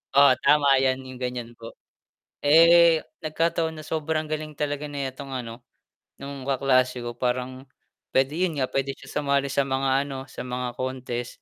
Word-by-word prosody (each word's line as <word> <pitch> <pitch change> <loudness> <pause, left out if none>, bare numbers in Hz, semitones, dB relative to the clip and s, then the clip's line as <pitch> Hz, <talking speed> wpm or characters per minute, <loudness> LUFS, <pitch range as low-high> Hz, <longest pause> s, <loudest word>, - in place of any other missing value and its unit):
Oo 140 -1 +8
tama 140 -2 +4
yan 130 0 +1
yung 130 -1 -10
ganyan 125 -2 -4
po. 115 0 -10 0.7
Eh, 165 +2 +7 0.2
nagkataon 165 +1 0
na 155 - -10
sobrang 155 0 -2
galing 155 0 -4
talaga 145 0 -3
netong 140 -1 -5
ano, 120 -2 -6 0.5
nung 140 -1 -8
kaklase 130 -2 +2
ko 120 - -4
parang, 130 +1 -2 0.5
pwede 135 +4 +2
yun 165 - -4
nga 130 -1 -1
pwede 135 0 -1
siya 135 -1 -14
sumali 140 -1 0
sa 140 0 +1
mga 135 +1 +1
ano, 135 - -6
sa - - -7
mga 125 0 -3
contest. 125 -2 -4
135 Hz, 160 wpm, -25 LUFS, 130-150 Hz, 0.7 s, Oo